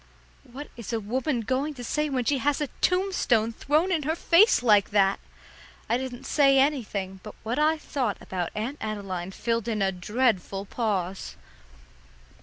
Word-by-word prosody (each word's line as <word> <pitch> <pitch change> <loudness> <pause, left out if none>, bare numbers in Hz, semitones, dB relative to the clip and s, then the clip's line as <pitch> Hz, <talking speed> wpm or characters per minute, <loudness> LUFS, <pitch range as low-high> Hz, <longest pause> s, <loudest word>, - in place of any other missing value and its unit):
What 285 +4 -8
is 235 -1 -7
a 230 - 0
woman 245 +4 -1
going 265 +7 -1
to 245 - -8
say 300 +5 -1
when 255 -3 -1
she 275 +2 +1
has 285 +3 +1
a 295 -3 -2
tombstone 360 - +2
thrown 305 +9 +1
in 335 -4 +1
her 310 +3 -1
face 340 - +4
like 210 -4 +4
that? 200 -1 +3 0.7
I 235 +2 +1
didn't 260 0 -6
say 275 -2 +4
anything, 215 -9 0
but 210 - -10
what 235 +5 -2
I 310 +1 +3
thought 260 -8 -2
about 180 -2 -4
Aunt 235 +8 -4
Adeline 195 -4 -4
filled 230 +3 -2
in 215 -3 0
a 190 - +2
dreadful 195 0 -1
pause. 195 -5 -3
240 Hz, 165 wpm, -26 LUFS, 205-285 Hz, 0.7 s, face